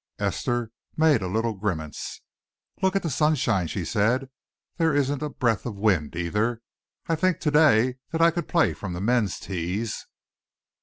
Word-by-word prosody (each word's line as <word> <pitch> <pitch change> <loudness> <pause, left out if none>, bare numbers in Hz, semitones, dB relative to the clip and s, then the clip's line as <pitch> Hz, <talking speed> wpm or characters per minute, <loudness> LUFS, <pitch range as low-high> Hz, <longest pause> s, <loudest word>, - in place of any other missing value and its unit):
Esther 120 -2 -1 0.3
made 155 -7 +4
a 95 - -2
little 110 +4 0
grimace. 90 -7 -4 0.6
"Look 190 0 +2
at 195 - +1
the 165 - -1
sunshine," 135 - +2
she 90 +1 -3
said. 125 +7 +1 0.5
"There 165 -3 +2
isn't 145 0 +1
a 150 - -2
breath 115 -6 0
of 115 -4 -5
wind, 95 -7 +1
either. 105 +7 -1 0.4
I 165 - 0
think 180 +3 +1
to 150 - +1
day 130 -5 +4
that 165 - -2
I 165 0 +6
could 170 -1 -3
play 170 -2 +3
from 95 -4 -6
the 90 - -4
men's 110 -3 +1
tees." 95 +4 -3
120 Hz, 165 wpm, -25 LUFS, 100-150 Hz, 0.6 s, I